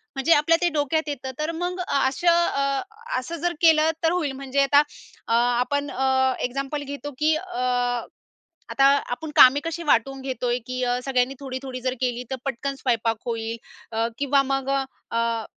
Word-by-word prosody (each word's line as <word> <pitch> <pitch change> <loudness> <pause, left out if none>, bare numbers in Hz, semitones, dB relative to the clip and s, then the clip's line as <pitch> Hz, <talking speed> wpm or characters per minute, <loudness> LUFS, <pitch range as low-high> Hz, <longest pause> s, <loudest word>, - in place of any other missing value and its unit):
म्हणजे 285 +5 +3
आपल्या 325 +3 +4
ते 350 - +3
डोक्यात 305 +1 0
येतं. 265 -2 -5
तर 305 +2 -1
मग 360 +1 -2
असं 275 +5 +1 0.2
अ, 275 -1 0 0.4
असं 330 +7 -6
जर 350 0 0
केलं, 320 -1 +5
तर 325 - +3
होईल. 330 -6 0
म्हणजे 275 +1 -2
आता 285 +1 +5 0.5
अ, - - 0 0.3
आपण 285 +3 -1
अ, 265 0 +2
एक्झाम्पल 275 +3 -3
घेतो, 290 +1 -6
की 310 +1 +3
अ, 250 -7 -1 0.6
आता 275 - +3 0.3
आपण 305 +5 -4
कामे 260 +3 +8
कशी 330 +1 -4
वाटून 270 -1 +1
घेतोय, 250 -2 -1
की 255 0 -3
अ, 245 0 +1
सगळ्यांनी 260 0 +1
थोडी-थोडी 260 -2 -6
जर 255 0 -1
केली, 250 -1 -1
तर - - 0
पटकन 275 +1 -3
स्वयंपाक 230 -4 0
होईल. 230 -1 -3 0.3
अ, 225 +1 0
किंवा 280 0 +3
मग 270 0 -2 0.4
अ 230 -1 0
270 Hz, 165 wpm, -24 LUFS, 250-290 Hz, 0.6 s, कामे